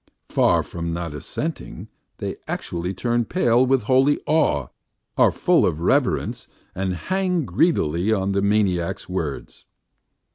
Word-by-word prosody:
Far - - +3
from 85 -1 -5
not 85 -2 -4
assenting, 145 - -5 0.3
they - - -5
actually 85 +1 -3
turn 120 +5 0
pale 120 -4 +2
with 130 -2 +2
holy 130 +5 +3
awe, 110 - +1 0.5
are - - +4
full - - +2
of 75 - 0
reverence - - 0 0.3
and 95 -1 -2
hang 185 - -1
greedily 90 - +1
on 100 -2 +1
the 100 0 +1
maniac's 100 -2 0
words. 80 -7 -5
100 Hz, 130 wpm, -22 LUFS, 85-130 Hz, 0.5 s, are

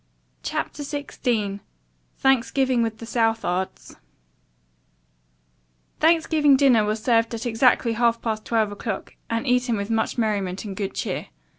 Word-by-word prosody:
CHAPTER - - -3
XVI 245 -8 -2 0.6
THANKSGIVING 260 -1 +2
WITH 225 -1 -1
THE 230 - -8
SOUTHARDS 225 -5 -1 2.0
Thanksgiving 315 -3 +4
dinner 260 -6 +5
was 215 +1 -2
served 230 -1 +2
at 230 +2 -6
exactly 235 0 +3
half 235 0 +2
past 220 -2 -3
twelve 220 -2 +1
o'clock, 205 0 -5 0.2
and 230 +3 -1
eaten 250 -2 +1
with 200 +2 -3
much 225 +2 0
merriment 200 -4 -1
and 200 -2 -6
good 195 0 -4
cheer. - - -3
230 Hz, 125 wpm, -24 LUFS, 215-255 Hz, 2.0 s, dinner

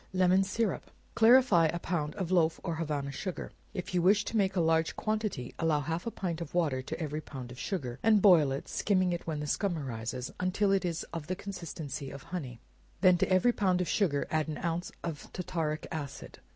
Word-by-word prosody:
Lemon 185 +1 +4
Syrup. 205 +1 -1 0.2
Clarify 225 -7 +6
a 170 - -2
pound 165 -4 -2
of 185 -3 -3
loaf 165 -3 +3
or 170 - -2
Havana 145 -4 -2
sugar, 180 +6 -4
or - - -10 0.2
if 185 0 -5
you 180 - +2
wish 200 +3 +4
to - - -4
make 195 -2 +2
a - - +2
large 160 -1 +2
quantity, 215 - -2
allow 160 -2 +2
half 165 +7 -3
a - - +2
pint 175 -6 -4
of 170 - -7
water 150 -7 +1
to 130 - -6
every 155 -1 -3
pound 130 -5 -8
of 125 - -10
sugar, 135 - -3
and 215 -1 +5
boil 175 -8 +6
it, 135 - -4
skimming 185 -3 +1
it 170 - -5
when 155 -2 -2
the - - -3
scum 180 +3 0
arises, 125 -2 -4
until 185 +2 +1
it 195 -1 +2
is 170 -1 -2
of 165 -3 -5
the 185 - -1
consistency 160 -8 -6
of 140 0 -9
honey; 130 -10 -6 0.4
then 185 -1 +7
to - - +2
every 185 +7 +4
pound 185 -4 +2
of 180 - 0
sugar, 160 -9 +1
add 155 -1 +1
an 155 - -4
ounce 170 +1 -2
of 160 -4 -6
tartaric 160 -4 -2
acid. 145 -4 -6
170 Hz, 215 wpm, -30 LUFS, 150-185 Hz, 0.4 s, then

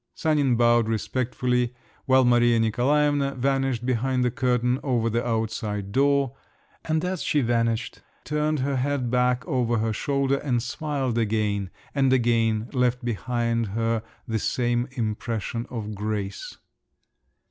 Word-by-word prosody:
Sanin 145 -5 +2
bowed 120 -1 +4
respectfully, 125 +2 -1 0.3
while 130 -1 +5
Maria 120 -1 +4
Nikolaevna 140 +5 +2
vanished 135 -2 0
behind 130 +1 +1
the 125 - +1
curtain 125 0 +1
over 120 -4 0
the 120 +2 0
outside 110 -3 -2
door; 140 +1 +2 0.5
and 160 +1 0
as 185 -2 -2
she 150 - +1
vanished 115 0 0 0.2
turned 150 -1 0
her 135 0 0
head 130 -2 -1
back 125 -2 +1
over 120 -2 +1
her 110 0 0
shoulder, 140 +3 0
and 125 -5 -1
smiled 135 -3 -2
again, 105 -3 0 0.2
and 135 -2 +2
again 115 -3 +2
left 125 -1 +1
behind 115 0 -1
her 115 +2 -1 0.3
the 110 -1 -1
same 120 +2 0
impression 115 +1 -3
of 110 -3 -5
grace. 105 -1 -4
120 Hz, 130 wpm, -25 LUFS, 115-135 Hz, 0.5 s, while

